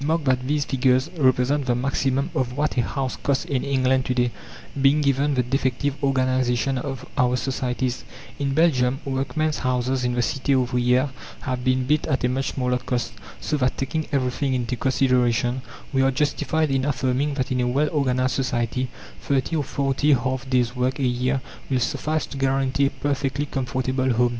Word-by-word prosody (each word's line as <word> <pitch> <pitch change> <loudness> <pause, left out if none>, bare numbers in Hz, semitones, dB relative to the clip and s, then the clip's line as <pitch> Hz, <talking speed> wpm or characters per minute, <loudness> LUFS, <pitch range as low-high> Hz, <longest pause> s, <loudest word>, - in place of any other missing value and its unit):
Mark 160 +2 +1
that 130 -2 +1
these 145 0 +1
figures 130 +3 +2
represent 130 -1 +2
the 120 - +2
maximum 135 +3 0
of 130 -4 -1
what 150 +1 0
a 125 - +3
house 130 +2 -3
costs 140 -1 0
in 135 -3 -1
England 130 -1 +2
to 125 - 0
day, 120 -1 +2 0.5
being 140 +2 +5
given 140 0 +2
the 125 - +2
defective 130 +2 0
organization 130 -1 +1
of 135 0 -5
our 125 -1 +3
societies. 125 0 -2 0.4
In 140 -1 -1
Belgium, 135 -5 +3
workmen's 145 +3 -1
houses 130 0 0
in 125 0 0
the 120 - +2
cités 135 +3 0
ouvrières 125 +1 +2 0.3
have 125 -1 -3
been 130 0 +2
built 150 +3 +1
at 135 -5 0
a 125 - +3
much 135 +1 -1
smaller 125 -1 0
cost. 125 -1 -2 0.3
So 150 - -1
that, 130 -2 0
taking 155 +4 -2
everything 135 0 0
into 125 0 -1
consideration, 125 -1 +1 0.3
we 135 - +3
are 135 - +4
justified 150 +2 0
in 135 -1 +1
affirming 140 +1 0
that 130 -2 -2
in 125 -1 +1
a 125 - +1
well 140 +5 +1
organized 130 -3 +1
society 125 -1 -1 0.3
30 140 +4 0
or 150 - 0
40 140 +2 +1
half 130 +1 -1
days' 125 -1 +1
work 125 +1 0
a 140 - -2
year 125 +1 +1 0.3
will 130 -2 +1
suffice 155 +5 -1
to 140 - -8
guarantee 135 0 +1
a - - 0
perfectly 140 -1 -2
comfortable 130 -1 -1
home. 120 +1 +3
130 Hz, 180 wpm, -23 LUFS, 125-140 Hz, 0.5 s, being